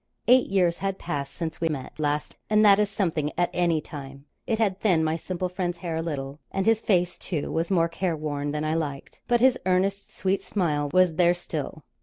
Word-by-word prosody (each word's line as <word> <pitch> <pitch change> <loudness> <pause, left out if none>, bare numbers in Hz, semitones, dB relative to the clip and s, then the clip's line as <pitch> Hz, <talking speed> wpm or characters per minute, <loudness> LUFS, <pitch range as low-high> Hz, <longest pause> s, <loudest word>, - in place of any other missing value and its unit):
Eight 255 +1 +6
years 180 -3 +2
had 195 -1 -2
passed 140 -5 -4
since 165 -2 -5
we 165 - +2
met 145 0 -6
last, 150 0 -1 0.2
and 215 0 +5
that 200 -1 +7
is 210 -1 +2
something 165 -7 -1
at 175 - +1
any 170 -3 +2
time. 140 -2 -9 0.2
It 225 - +1
had 200 -4 +1
thinned 170 -7 +3
my 155 +1 +1
simple 180 +2 -3
friend's 180 -1 -3
hair 170 -3 -4
a - - -1
little, 145 -3 -4
and 195 0 -1
his 225 -1 +3
face, 180 -3 +1
too, 160 -6 -3
was 165 +1 -1
more 170 -4 +3
careworn 155 -5 -2
than 150 +1 -2
I 155 - 0
liked, 145 -4 -4
but 240 -1 +3
his 255 0 +4
earnest, 190 +2 0
sweet 190 +1 -1
smile 150 -7 -1
was 185 -3 +3
there 175 0 +4
still. 155 -3 -5
175 Hz, 210 wpm, -26 LUFS, 155-195 Hz, 0.2 s, that